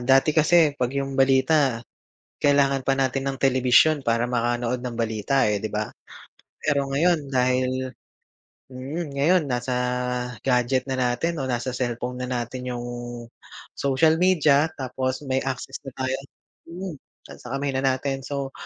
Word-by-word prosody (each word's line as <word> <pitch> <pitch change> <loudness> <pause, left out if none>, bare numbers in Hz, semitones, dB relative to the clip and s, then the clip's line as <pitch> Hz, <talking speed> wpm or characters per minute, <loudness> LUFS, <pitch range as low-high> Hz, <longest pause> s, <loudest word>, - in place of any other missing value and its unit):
dati 135 +4 +4
kasi 160 0 +4
'pag 125 -3 -1
'yung 135 0 -2
balita 135 -2 +3 0.6
kailangan 140 -2 +3
pa 135 +1 +1
natin 135 +1 0
ng 135 - -8
telebisyon 135 +3 +4
para 115 +1 +1
makanood 120 0 -1
ng 120 -2 -5
balita, 115 +4 +1
eh, 105 -1 -1
di 110 - -3
ba? 105 0 -2 0.7
Pero 140 -2 +1
ngayon 150 -2 +1
dahil 130 0 0 0.7
mm, 140 +4 -6
ngayon 165 +5 +3
nasa 125 0 -2 0.7
gadget 125 0 +2
na 130 - -1
natin 130 +7 0
o 135 - -2
nasa 125 0 -2
cellphone 125 0 -3
na 125 - -3
natin 125 0 -4
'yung 120 -1 -4 0.9
social 155 +4 +2
media 160 -5 +4
tapos 130 +1 -3
may 130 -1 0
access 135 0 -4
na 130 - -8
tayo 130 0 -2 0.5
mm, 175 -2 -7 0.4
sa 125 +2 -6
kamay 140 0 -1
na 130 - -1
natin, 135 0 0
so 140 -1 -3
130 Hz, 145 wpm, -24 LUFS, 125-140 Hz, 0.9 s, dati